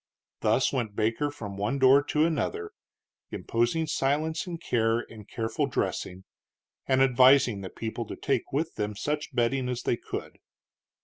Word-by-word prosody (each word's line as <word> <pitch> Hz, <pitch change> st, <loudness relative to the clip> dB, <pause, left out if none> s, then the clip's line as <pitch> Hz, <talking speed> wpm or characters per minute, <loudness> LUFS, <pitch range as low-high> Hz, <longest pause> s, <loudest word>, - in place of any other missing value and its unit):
Thus -, -, +2 dB
went 110 Hz, -5 st, -2 dB
Baker 115 Hz, +7 st, 0 dB
from 105 Hz, -8 st, -8 dB
one 105 Hz, +7 st, -1 dB
door 135 Hz, +1 st, +6 dB
to 150 Hz, +1 st, +2 dB
another, 425 Hz, -, -2 dB, 0.6 s
imposing 120 Hz, +8 st, 0 dB
silence 155 Hz, +4 st, -1 dB
and 170 Hz, -2 st, -5 dB
care 115 Hz, -5 st, +1 dB
and 110 Hz, -4 st, -13 dB
careful 115 Hz, -1 st, -1 dB
dressing, 90 Hz, +1 st, -3 dB, 0.6 s
and 130 Hz, 0 st, +4 dB
advising 130 Hz, -4 st, +5 dB
the 95 Hz, -, -6 dB
people 115 Hz, +2 st, -5 dB
to -, -, -6 dB
take -, -, -1 dB
with 155 Hz, +4 st, -1 dB
them 105 Hz, 0 st, -2 dB
such 150 Hz, +7 st, -3 dB
bedding 125 Hz, +2 st, +1 dB
as 125 Hz, -1 st, -3 dB
they 120 Hz, -, +1 dB
could. -, -, -7 dB
125 Hz, 150 wpm, -27 LUFS, 110-145 Hz, 0.6 s, door